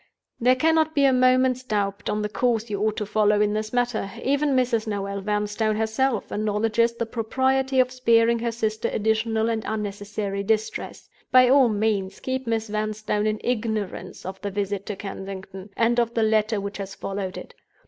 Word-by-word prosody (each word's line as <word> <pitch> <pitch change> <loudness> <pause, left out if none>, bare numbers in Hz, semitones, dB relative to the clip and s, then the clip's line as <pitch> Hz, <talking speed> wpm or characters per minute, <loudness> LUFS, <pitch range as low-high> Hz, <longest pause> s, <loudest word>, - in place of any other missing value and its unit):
"There 250 +2 +4
cannot 315 +3 +2
be 280 -1 +4
a 270 - +5
moment's 255 0 +3
doubt 205 -4 -2
on 210 0 -1
the - - 0
course 230 0 0
you 200 -1 -2
ought 215 0 0
to 210 - -2
follow 210 0 +2
in 210 0 +2
this 215 0 -2
matter. 245 -5 0
Even 280 +1 +1
Mrs. 240 -3 +1
Noel 200 -1 -3
Vanstone 210 +1 0
herself 220 +2 0
acknowledges 220 +2 +1
the 235 - -2
propriety 260 +4 0
of 255 0 +3
sparing 235 -2 +3
her 235 0 -1
sister 220 -1 -2
additional 220 +1 +1
and 225 -1 -1
unnecessary 205 -1 -3
distress. 220 +2 -2 0.2
By 255 -1 +7
all 265 -2 +6
means, 205 -3 -1
keep 260 -1 -3
Miss 225 -1 -1
Vanstone 215 0 -1
in 215 0 -1
ignorance 220 -4 -3
of 190 +1 -7
the 205 - -3
visit 200 0 -3
to 210 - -3
Kensington, 195 0 -8
and 235 +1 +3
of 235 0 0
the 225 - +2
letter 215 0 +2
which 200 +1 -6
has 195 0 -6
followed 195 -1 -4
it. - - -9
220 Hz, 180 wpm, -24 LUFS, 205-240 Hz, 0.2 s, By